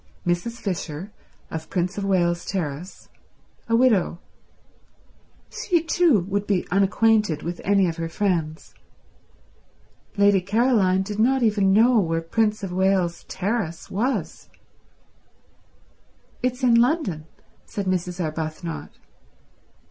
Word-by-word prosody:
Mrs. 175 +7 -1
Fisher, 190 -5 -5 0.4
of 160 -1 -6
Prince 180 +1 -1
of 205 - -3
Wales 175 -3 +1
Terrace. 175 -1 -5 0.6
A 230 - +3
widow. 230 -8 +3 1.3
She 345 -4 0
too 330 - +3
would 200 +3 -3
be 195 -3 0
unacquainted 200 -2 +2
with 170 +1 -5
any 195 -1 +3
of 165 0 -3
her 165 0 -3
friends. 165 -5 -2 1.4
Lady 200 -1 +4
Caroline 200 -2 +2
did 205 +1 -6
not 260 +3 +3
even 205 -3 +3
know 230 +4 +5
where 165 -4 0
Prince 210 +5 0
of 190 - -4
Wales 185 -2 +1
Terrace 190 -4 -3
was. 245 +7 -2 1.9
"It's 255 +1 -2
in 245 -2 +5
London," 235 - +2 0.4
said 200 - -4
Mrs. 180 -1 -2
Arbuthnot. 160 0 -4
195 Hz, 110 wpm, -23 LUFS, 175-225 Hz, 1.9 s, know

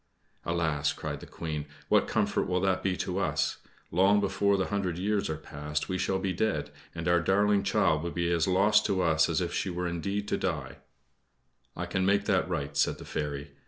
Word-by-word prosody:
"Alas!" 80 -4 0
cried - - -5
the - - -11
Queen, 75 -3 -5 0.2
"what - - +3
comfort - - 0
will 90 0 +1
that 95 0 +1
be 95 -2 0
to 90 +1 -2
us? 100 - 0 0.3
Long 95 +4 +4
before 100 0 +2
the 95 - 0
hundred 95 -4 -1
years 100 +1 0
are 80 - -2
past 75 -1 -4
we 95 0 -1
shall 95 - +1
be 95 0 -1
dead, 110 +3 -1 0.2
and 85 0 -4
our 85 0 +4
darling 100 +3 +3
child 80 -5 +2
will 85 - -3
be 85 0 -1
as 85 0 +2
lost 105 +3 +4
to 95 -2 +1
us 80 -1 +3
as 85 +2 +1
if 85 -1 -2
she - - -1
were 90 0 -2
indeed 100 +5 -2
to - - +1
die!" 70 -7 -3 1.0
"I - - -3
can 95 - -1
make 100 +2 +2
that - - +1
right," 70 0 -3
said - - +2
the - - -10
fairy. 75 -1 -4
90 Hz, 205 wpm, -29 LUFS, 80-95 Hz, 1.0 s, Long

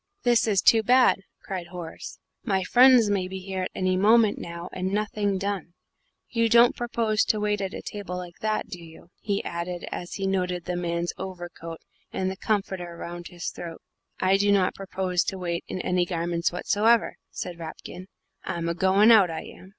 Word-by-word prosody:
"This 240 -2 +3
is 200 -3 +2
too 225 - +6
bad!" 250 0 +4 0.2
cried 185 -3 -5
Horace; 175 -2 -8 0.3
"my 195 -6 0
friends 245 0 +6
may 190 -2 0
be 190 +1 -6
here 190 0 -4
at - - -6
any 185 0 +1
moment 215 +2 +4
now 170 +1 -7
and 185 +1 -2
nothing 205 -1 0
done. 195 -3 -4 0.5
You 230 -1 +1
don't 235 +1 +6
propose 230 -3 0
to 215 - +1
wait 210 -1 0
at 195 0 -3
table 190 -3 -5
like 175 -1 -8
that, 215 0 0
do 175 -2 -8
you?" 165 +1 -14
he 200 -2 -2
added, 170 +1 -4
as 175 - -5
he 195 - -3
noted 180 -2 -1
the 180 - -2
man's 170 0 -2
overcoat 175 -3 -7 0.3
and 190 0 -1
the - - -5
comforter 190 -4 -2
round 175 0 -7
his 175 -1 -5
throat. 165 -2 -8 0.4
"I 190 +1 +3
do 205 +1 +2
not 195 -2 +3
propose 185 -2 -1
to 190 - -3
wait 170 -2 -3
in - - -4
any 180 -1 +1
garments 170 -1 -1
whatsoever," 220 +6 +2
said 175 -2 -6
Rapkin; 175 +3 -8 0.4
"I'm 170 -1 -3
a - - 0
goin' 190 +5 +5
out, 205 -6 +7
I 160 - -5
am." 185 - -13
185 Hz, 185 wpm, -26 LUFS, 175-205 Hz, 0.5 s, out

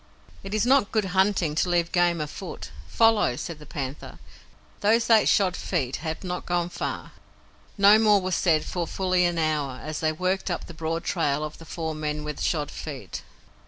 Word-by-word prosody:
"It 195 +2 -5
is 215 +1 +2
not 260 -4 +3
good 215 -3 +1
hunting 190 -5 +2
to 160 +4 0
leave 170 -1 +1
game 175 -1 +2
afoot. 160 +5 -7 0.2
Follow!" 225 - +3
said 165 +4 -6
the 150 - -13
panther. 140 -3 -6 0.6
"Those 225 +2 +3
eight 220 -2 +6
shod 190 -3 +3
feet 135 -8 -2
have 160 +2 -5
not 180 -1 -4
gone 175 -1 0
far." - - -5 0.7
No 205 +2 +7
more 210 -2 +5
was 185 0 -3
said 160 -4 +2
for 175 -2 -3
fully 185 0 +1
an 175 -1 0
hour, 150 -5 -1
as 155 0 -4
they 155 -1 +1
worked 185 +4 -1
up 175 - -3
the 170 - -10
broad 165 +1 -3
trail 150 -5 0
of 155 0 -6
the 165 - -11
four 160 -1 -4
men 150 0 -3
with 150 -1 -5
shod 150 -4 -1
feet. 135 - -7
170 Hz, 190 wpm, -25 LUFS, 155-190 Hz, 0.7 s, No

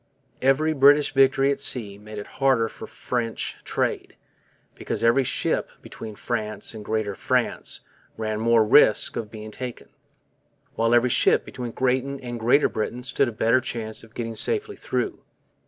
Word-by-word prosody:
Every 140 +4 +3
British 145 +1 +5
victory 135 0 +4
at 140 - -3
sea 105 -7 -2
made 105 0 -10
it 105 - -5 0.2
harder 130 -4 +3
for - - -10
French 120 -2 -3
trade, - - -2 0.6
because - - -4
every 120 +4 +4
ship - - 0
between 110 -2 -9
France 110 -1 -3
and 110 -2 -8
Greater 110 -1 -1
France - - -1 0.4
ran 110 -1 -2
more 115 0 +4
risk 105 -1 +5
o - - -1
being 110 0 -10
taken, 125 +1 -7 0.8
while 115 +1 +2
every 120 +1 +3
ship - - +3
between 125 -1 -6
Britain 130 +3 -1
and 120 -2 -6
Greater 120 +6 +4
Britain 120 +3 -4
stood 130 +2 +1
a - - -3
better 115 +3 +2
chance 110 -3 -5
of 115 0 -17
getting 115 -1 -4
safely 420 - -1
through. - - -3
120 Hz, 155 wpm, -24 LUFS, 110-135 Hz, 0.8 s, British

